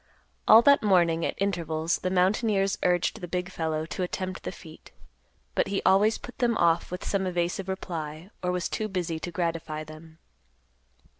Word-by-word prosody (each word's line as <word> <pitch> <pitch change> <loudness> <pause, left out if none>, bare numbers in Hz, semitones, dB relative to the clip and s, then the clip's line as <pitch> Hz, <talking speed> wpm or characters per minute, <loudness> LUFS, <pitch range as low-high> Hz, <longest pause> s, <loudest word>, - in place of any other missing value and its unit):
All 225 +2 +9
that 280 +2 +6
morning 170 -5 +3
at - - -4
intervals 170 -4 -1
the 185 - -2
mountaineers 195 +2 +2
urged 180 +4 +1
the 175 - -5
big 180 +1 -3
fellow 160 -2 -2
to 180 - -5
attempt 185 +1 -3
the - - -5
feat, 160 -2 -13 0.6
but - - +1
he 195 - -1
always 205 +4 +4
put 245 - -11
them 235 -3 +2
off 170 0 +2
with 180 +1 -6
some 195 -2 0
evasive 175 +2 -2
reply, 170 -2 -5
or 180 - 0
was 180 0 -1
too 215 - -3
busy 175 -5 -3
to 175 - -5
gratify 165 -2 -3
them. 155 +1 -13
180 Hz, 170 wpm, -27 LUFS, 165-195 Hz, 0.6 s, All